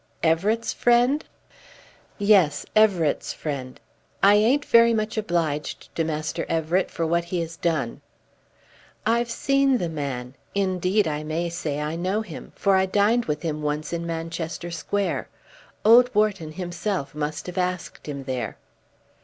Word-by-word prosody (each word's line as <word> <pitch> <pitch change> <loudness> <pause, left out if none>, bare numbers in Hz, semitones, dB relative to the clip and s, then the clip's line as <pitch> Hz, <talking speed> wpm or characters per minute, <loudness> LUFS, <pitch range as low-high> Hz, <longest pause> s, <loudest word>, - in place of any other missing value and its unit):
"Everett's 195 +8 +1
friend?" 245 +5 +3 0.9
"Yes; 195 -8 +4
Everett's 190 -8 +3
friend. 135 -4 -5 0.4
I 200 +1 +8
ain't 240 +8 +3
very 230 0 +5
much 215 0 -1
obliged 170 -8 -2
to 165 - +1
Master 155 -1 -2
Everett 165 +3 +1
for 165 - -2
what 170 +1 +1
he 175 +1 -2
has 165 0 -5
done." 160 -8 -1 1.0
"I've 235 +1 +2
seen 275 +2 +2
the 175 -7 -2
man. 135 -5 -4 0.2
Indeed, 190 0 +1
I 150 -1 -2
may 165 +3 -2
say 160 -4 -3
I 150 +2 -2
know 185 +5 0
him, 220 - -9
for 195 -1 +2
I 190 0 +3
dined 210 +5 +2
with 150 +1 -3
him 155 -2 -2
once 150 +2 -2
in 170 0 -3
Manchester 165 +1 -4
Square. 200 +4 -2 0.6
Old 240 +3 +7
Wharton 205 -7 +1
himself 175 -1 -3
must 150 0 -3
have 180 +1 -4
asked 180 -2 -3
him 140 -2 -5
there." 130 -3 -4
175 Hz, 145 wpm, -24 LUFS, 155-210 Hz, 1.0 s, I